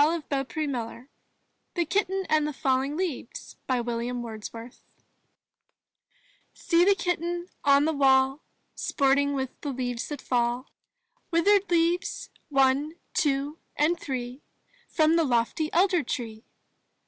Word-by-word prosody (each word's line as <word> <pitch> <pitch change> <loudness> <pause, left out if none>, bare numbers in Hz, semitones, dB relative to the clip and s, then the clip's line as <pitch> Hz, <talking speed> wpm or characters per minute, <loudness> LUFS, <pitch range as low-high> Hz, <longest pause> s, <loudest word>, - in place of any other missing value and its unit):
184 300 -2 0
IN 290 - -2
THE 260 - -1
NURSERY 235 +2 -8 0.7
THE 345 -2 +1
KITTEN 385 +2 0
AND 300 -2 +1
FALLING 270 +3 0
LEAVES 345 -10 -5
William 240 -1 -1
Wordsworth 230 +1 -8 1.7
See 340 0 +3
the 400 +2 +5
Kitten 350 -1 -2
on 280 0 +5
the 320 - +1
wall, 270 0 +3 0.3
Sporting 280 +1 +1
with 265 -2 -2
the 290 - -3
leaves 245 -3 -3
that 295 - -5
fall, 245 +1 -1 0.6
Withered 395 +4 +3
leaves 345 +1 0
— - - -42
one 275 +2 +2
— - - -45
two 290 -1 0
— - - -45
and 330 +4 +2
three 255 -1 -5 0.2
— - - -34
From 315 +1 +5
the 335 - +4
lofty 255 +4 0
elder 360 0 +3
tree! 225 -5 -5
285 Hz, 135 wpm, -27 LUFS, 255-335 Hz, 1.7 s, the